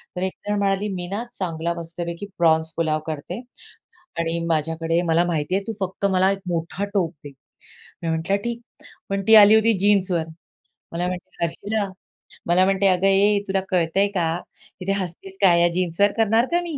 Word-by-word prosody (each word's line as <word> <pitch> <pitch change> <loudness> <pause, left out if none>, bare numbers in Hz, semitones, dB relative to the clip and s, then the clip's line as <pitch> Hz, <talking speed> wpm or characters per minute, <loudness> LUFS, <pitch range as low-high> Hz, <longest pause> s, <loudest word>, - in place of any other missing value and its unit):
तर 180 - -3
एक 190 - -1
जण 205 0 0
म्हणाली, 200 +1 0
"मी 175 -1 -5
ना 205 +5 -3
चांगला 170 -3 -3
मस्तपैकी 170 +2 -6
प्रॉन्स 160 -1 +2
पुलाव 155 -2 +1
करते 160 +6 -5 0.8
आणि 165 0 -1
माझ्याकडे 165 +1 0
मला 170 0 +2
माहिती 170 +1 -1
आहे. 195 - +1
तू - - -1
फक्त 190 +1 -2
मला 190 +1 +3
1 195 - -4
मोठा 170 +3 -2
टोप 175 -4 +1
दे." - - -7 0.7
मी 165 - -2
म्हटलं, 165 +5 0
"ठीक." 235 0 -4 0.5
पण 195 0 -1
ती 220 - +8
आली 210 +1 +9
होती 220 +1 +4
जीन्सवर. 190 -4 +2 0.7
मला 175 +2 -2
म्हणते, 180 -1 -6
"हर्षला" 205 +5 -2 0.6
मला 180 +2 +4
म्हणते, 195 0 +2
"अगं 185 +1 +3
ए, 200 +1 +4
तुला 195 0 0
कळतं 175 0 +1
आहे 200 - +4
का? 170 -2 -1 0.4
इथे 195 +2 -1
हसतेस 190 +2 -8
काय 190 -3 +6
आहे? 170 0 +4
या 175 - +5
जीन्सवर 185 +3 +1
करणार 225 +2 +3
का 350 +1 +2
मी?" 330 -4 -5
185 Hz, 180 wpm, -22 LUFS, 170-200 Hz, 0.8 s, आली